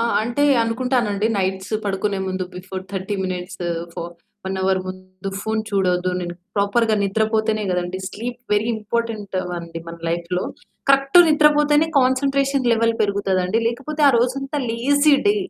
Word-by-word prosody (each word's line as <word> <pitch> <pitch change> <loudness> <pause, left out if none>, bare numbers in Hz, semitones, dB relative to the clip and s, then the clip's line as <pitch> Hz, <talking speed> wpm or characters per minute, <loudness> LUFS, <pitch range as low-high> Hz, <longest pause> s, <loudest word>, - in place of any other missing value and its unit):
ఆ! 230 - +2 0.2
అంటే 240 +6 -1 0.2
అనుకుంటానండి. 230 -3 0
నైట్స్ 190 +2 -2
పడుకునే 200 0 -1
ముందు 185 0 -2
బిఫోర్ 185 +1 -6
30 195 +1 -3
మినిట్సు, 180 -1 -4 0.2
ఫో 170 - -5 0.4
1 190 0 -2
అవర్ 190 0 +2
ముందు 185 0 -8
ఫోను 220 +1 -1
చూడద్దు 185 -2 +1
నేను, 175 -1 -5 0.2
ప్రాపర్‌గా 215 +3 +2
నిద్రపోతేనే 215 +1 +1
కదండీ! 180 +1 -2
స్లీప్ 240 +5 -6
వెరీ 210 +1 +2
ఇంపార్టెంట్ 220 -2 -3 0.2
అండి 165 -1 -7
మన 170 0 -7
లైఫ్‌లో. 170 +2 -2 0.5
Correct 275 +4 +5
నిద్రపోతేనే 300 0 +4
concentration 275 0 +1
level 230 0 +2
పెరుగుతదండి. 200 -1 +1
లేకపోతే 285 +6 -4
ఆ - - +7
రోజంతా 270 +4 -1
లేజీ 285 +6 +3
డే. 410 - +3
215 Hz, 135 wpm, -21 LUFS, 185-250 Hz, 0.5 s, ఆ